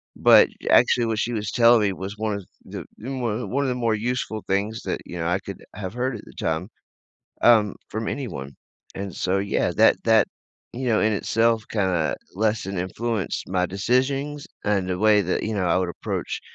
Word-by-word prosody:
but, - - +7 0.2
actually, 120 -2 +5
what 110 -1 -1
she 120 0 -1
was 105 -2 -2
telling 115 -1 +5
me 100 -2 +1
was 95 +3 -6
one 105 -3 -2 0.2
the - - -7
one 120 -2 -3
one 140 +2 +1
of - - 0
the 125 - -1
more 115 -2 +1
useful 115 -1 -2
things 105 +3 -1
that, - - -2
you 90 - -7
know, 80 - -1
I 90 +3 +1
could 100 0 -9
have 95 -2 -5
heard 125 +1 -1
at - - -9
the - - -14
time, 80 +3 -2 0.8
um, 110 -4 +5
from 110 +1 -3
anyone. 70 - -5 0.4
And 95 -2 -5
so, 95 +1 0
yeah, 100 +1 0
that - - +5
that, 110 -3 +5 0.5
you 130 +2 -4
know, 110 -3 +3
in 110 0 +2
itself 115 +2 +1
kinda 90 -7 0 0.2
less 110 +2 +1
than 95 -1 -4
influenced 105 +3 -2
my 90 -1 +1
decisions, 135 - 0 0.2
and 100 -3 +1
the 90 -1 -1
way 105 0 +5
that, 90 - -1
you 110 0 -2
know, 95 -3 0
I 85 - +3
would 90 -1 -1
approach, - - -4
105 Hz, 195 wpm, -24 LUFS, 95-115 Hz, 0.8 s, but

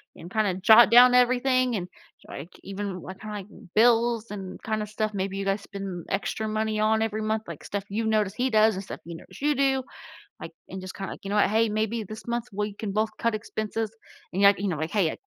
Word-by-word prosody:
and 175 +3 -11
kinda 215 -4 +1
jot 220 +5 +7
down 245 +1 +8
everything 255 0 +3
and, 180 -4 -3 0.4
like, 150 +6 -8
even 195 -2 -5
what 185 +3 -9
kinda, 215 -1 -6
like, 195 -1 -8 0.3
bills 230 0 +3
and 195 -2 -7
kinda 215 -1 -2
stuff 215 0 -2
maybe 195 0 -2
you 195 - -2
guys 195 +1 0
spend 195 -4 -7
extra 215 +2 -2
money 215 0 -1
on 220 +1 +2
every 220 -1 -1
month, 215 0 -1
like, 160 - -8
stuff 200 -1 -3
you've 220 +3 -1
noticed 215 -2 +1
he 260 +1 +1
does 220 -1 +4
and 190 - -5
stuff 200 - -8
you 170 0 -7
notice - - -14
you 295 +1 +2
do, 270 -1 +2 0.6
like, - - -8 0.2
and 190 0 -6
just 185 - -7
kinda, 195 0 -5
like, - - -15
"You - - -4
know 205 - -1
what, 205 - +4
hey, 225 +1 +2
maybe 220 +2 -1
this 215 +3 -10
month, 235 0 -1
we 210 +1 -2
can 210 -1 -4
both 215 +1 +1
cut 230 -1 0
expenses," 215 0 -3 0.4
and, 190 - 0 0.2
you 200 - -1
know, 165 - -2
like, 160 +3 -3
"Hey, 195 -7 +1
215 Hz, 225 wpm, -26 LUFS, 195-225 Hz, 0.6 s, down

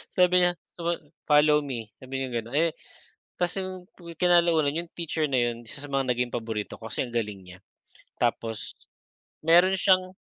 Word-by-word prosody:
Sabi 180 0 +5
niya, 175 - +3 0.3
guma 170 0 0 0.3
"follow 150 0 +5
me," 115 -6 -5
sabi 135 +1 -5
niyang 125 -3 -2
gano'n, 120 +4 -7
eh, 165 +2 +3 0.7
tapos 175 -1 0
yung 185 0 -4 0.4
kinalaunan 170 -4 +4
yung 165 - -24
teacher 165 -2 -1
na 135 - 0
'yon 120 0 -2
isa 140 +5 -6
sa 145 - -8
mga 135 -2 +1
naging 125 0 -1
paborito 110 -2 -4
ko 110 - -7
kasi - - -1
ang 120 - -10
galing 105 -4 -2
niya. 90 0 -13 0.6
Tapos 115 -2 -1 0.7
meron 175 +3 +6
siyang 185 -1 +3
145 Hz, 170 wpm, -27 LUFS, 120-170 Hz, 0.7 s, meron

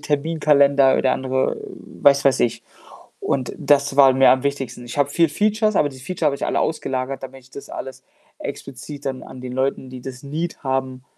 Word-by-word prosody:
Terminkalender 140 -2 +3
oder 130 - +2
andere 130 0 -1 0.5
was 140 -1 +5
weiß 135 -1 +3
ich 115 -1 0 0.6
und 130 -2 -1
das 140 -1 +2
war 135 -2 +7
mir 130 +1 +5
am 130 0 +3
wichtigsten. 135 -3 -3
Ich 120 +4 -7
habe 140 -1 +3
viel 165 +2 +3
Features, 215 +4 +1
aber 145 - +3
diese 130 -2 -12
Feature 170 0 -2
habe 145 - +2
ich - - -4
alle - - 0
ausgelagert, 135 -3 -2
damit 135 0 -9
ich 130 - -22
das 140 - -10
alles 130 0 -8 0.3
explizit 140 +3 -8
dann 130 -1 -3
an 130 - -11
den 125 0 -7
Leuten, 130 0 -1
die 130 -1 -8
das 130 -1 -8
Need 155 +5 -4
haben 130 -1 -2
135 Hz, 195 wpm, -21 LUFS, 130-145 Hz, 0.6 s, war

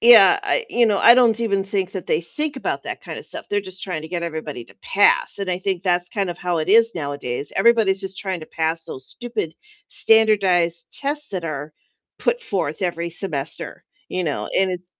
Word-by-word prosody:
yeah, 235 - +7
I 430 +4 0
you 240 -1 +3
know, 210 -2 +2
I 235 - +8
don't 235 -3 +4
even 200 -4 +1
think 195 -1 -2
that 190 -3 -6
they 155 - 0
think 300 - -4
about 265 - -3
that - - -6
kinda - - -7
stuff. - - -6
They're 205 - +1
just 190 -1 -11
trying 180 -5 -3
to 160 - -9
get 175 0 -3
everybody 155 -7 -5
to - - -20
pass, 205 +1 +3
and 195 -2 -3
I 180 - -1
think 190 -1 -2
that's 180 -1 +1
kind 195 -2 -2
of 175 - -7
how 180 -1 -1
it 160 +2 -1
is 230 +2 +5
nowadays. 140 -4 -4
Everybody's 205 -2 +3
just 195 -1 -6
trying 190 -3 -3
to 155 - -9
pass 160 0 -2
those 130 0 -8
stupid 230 -9 -5 0.3
standardized 200 - +3
tests 295 +1 +1
that 185 -4 -3
are 150 -1 -5 0.4
put 485 0 0
forth 180 - -3
every 170 -2 -2
semester, 165 -6 -2 0.2
you 185 0 -2
know? 150 -3 -3
And 190 -1 +2
it's 180 0 -7
185 Hz, 210 wpm, -21 LUFS, 165-220 Hz, 0.4 s, I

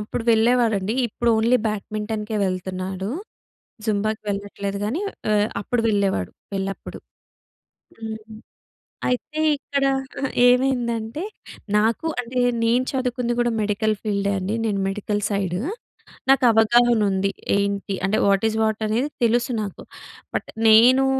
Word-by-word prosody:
అప్పుడు 210 +2 -4
వెళ్ళేవాడండి. 225 -3 +2
ఇప్పుడు 235 +2 -2
only 230 +3 +4
bat 210 -2 -2
మింటెన్‌కే 215 0 -3
వెళ్తన్నాడు. 185 +1 -3 0.8
జుంబాకి 215 0 -1
వెళ్ళట్లేదు 200 0 -3
గానీ, 245 - -1 0.3
ఆహ్, 210 0 +3
అప్పుడు 240 +4 -1
వెళ్ళేవాడు, 200 - +1 0.2
పెళ్లప్పుడు. 195 0 -4 1.0
హ్మ్. 220 -1 -5 0.9
అయితే, 300 +5 -2 0.2
ఇక్కడ 280 0 -2 0.4
అహా! 275 - 0 0.2
ఏమైందంటే, 245 0 +1 0.6
నాకు 225 +8 +1
అంటే, 245 +1 -3 0.2
నేను 240 +3 +3
చదువుకుంది 250 -2 -1
గూడా 240 -1 +1
మెడికల్ 215 +1 +1
ఫీల్డే 200 -2 0
అండి. 190 +3 -2
నేను 200 -2 0
మెడికల్ 205 +1 -2
సైడ్. 195 -3 -1 0.7
నాకవగాహనుంది. 225 -5 +4 0.2
ఏంటి 200 -1 -1
అంటే, 200 +2 +1
వాట్ 200 +2 +3
ఇస్ 220 - -4
వాట్ 220 0 0
అనేది 245 +7 0
తెలుసు 240 +2 +2
నాకు, 200 -3 -7 0.5
బట్ - - -4 0.2
నేనూ 245 +5 +7
220 Hz, 115 wpm, -23 LUFS, 200-240 Hz, 1.0 s, నేనూ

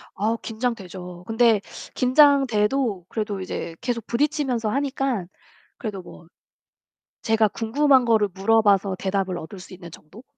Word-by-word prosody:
아 220 +3 0
긴장되죠. 190 -7 -5
근데 225 -2 +3 0.3
긴장돼도 255 - +3
그래도 210 -3 -3
이제 170 -2 -5
계속 235 -3 -3
부딪히면서 270 -4 0
하니까 270 -5 -1 0.5
그래도 205 -5 -5
뭐 170 -1 -14 0.9
제가 220 -1 +2
궁금한 260 +4 +2
거를 220 -3 +3
물어 225 +4 +3
봐서 200 -2 +2
대답을 190 -2 -1
얻을 170 +4 -9
수 185 - -12
있는 175 -2 -11
정도? 180 +10 -14
220 Hz, 295 characters per minute, -23 LUFS, 195-250 Hz, 0.9 s, 근데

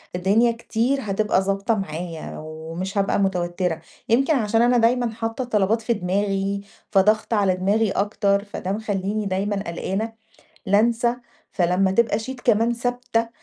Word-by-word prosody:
الدنيا 210 +6 +3
كتير 235 +3 -1
هتبقى 210 -2 +1
ضابطة 195 +4 0
معايا 170 -4 -5
ومش 160 +5 -6
هابقى 200 0 +2
متوتَّرة، 180 -3 -1 0.3
يمكن 270 +6 +3
عشان 225 -2 +2
أنا 245 +1 +4
دايمًا 240 +1 +3
حاطّة 225 +2 -3
الطلبات 220 -1 +1
في 235 +1 +1
دماغي 195 +1 -1 0.3
فضاغْطة 215 +3 +3
على 195 -2 +2
دماغي 200 +3 +1
أكتر، 200 0 +1
فده 195 -2 -5
مخلّيني 205 0 -2
دايمًا 195 +2 -1
قلقّانة 195 +6 -3 0.5
لانْسى، 230 +4 +3 0.4
فلمّا 185 +1 +2
تبقى 210 +1 +2
sheet 250 +3 -6
كمان 225 +3 +3
ثابتة 245 -1 -1
205 Hz, 135 wpm, -23 LUFS, 190-230 Hz, 0.5 s, أنا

